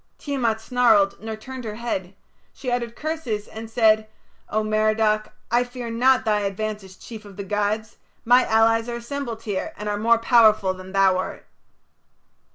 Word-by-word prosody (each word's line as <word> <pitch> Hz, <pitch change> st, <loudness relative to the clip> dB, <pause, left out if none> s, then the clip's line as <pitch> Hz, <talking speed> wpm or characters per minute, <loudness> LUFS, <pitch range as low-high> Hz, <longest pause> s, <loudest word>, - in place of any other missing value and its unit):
Tiamat 245 Hz, -6 st, -1 dB
snarled 225 Hz, -5 st, +3 dB
nor 220 Hz, 0 st, -5 dB
turned 255 Hz, +4 st, -9 dB
her 215 Hz, -2 st, -5 dB
head. 195 Hz, -5 st, -4 dB, 0.4 s
She 255 Hz, -, -5 dB
uttered 235 Hz, -1 st, -2 dB
curses, 285 Hz, -10 st, -3 dB
and 220 Hz, 0 st, -9 dB
said: 220 Hz, -2 st, +3 dB, 0.4 s
"O 215 Hz, +1 st, 0 dB
Merodach, 215 Hz, 0 st, +1 dB, 0.2 s
I 240 Hz, +1 st, +3 dB
fear 245 Hz, -1 st, -7 dB
not 250 Hz, +2 st, +3 dB
thy 210 Hz, -1 st, +2 dB
advance 210 Hz, +1 st, -3 dB
as 190 Hz, -1 st, -13 dB
chief 220 Hz, +2 st, -10 dB
of 200 Hz, -2 st, -13 dB
the 200 Hz, -, -4 dB
gods. 210 Hz, +2 st, -2 dB, 0.3 s
My 245 Hz, +2 st, +6 dB
allies 225 Hz, +1 st, +3 dB
are 240 Hz, -, -3 dB
assembled 235 Hz, -1 st, -5 dB
here, 215 Hz, +9 st, -3 dB
and 210 Hz, -, -6 dB
are 205 Hz, 0 st, -1 dB
more 230 Hz, +2 st, +4 dB
powerful 220 Hz, -5 st, +4 dB
than 185 Hz, 0 st, -11 dB
thou 195 Hz, -1 st, +4 dB
art." 185 Hz, -, -5 dB
220 Hz, 165 wpm, -23 LUFS, 210-235 Hz, 0.4 s, My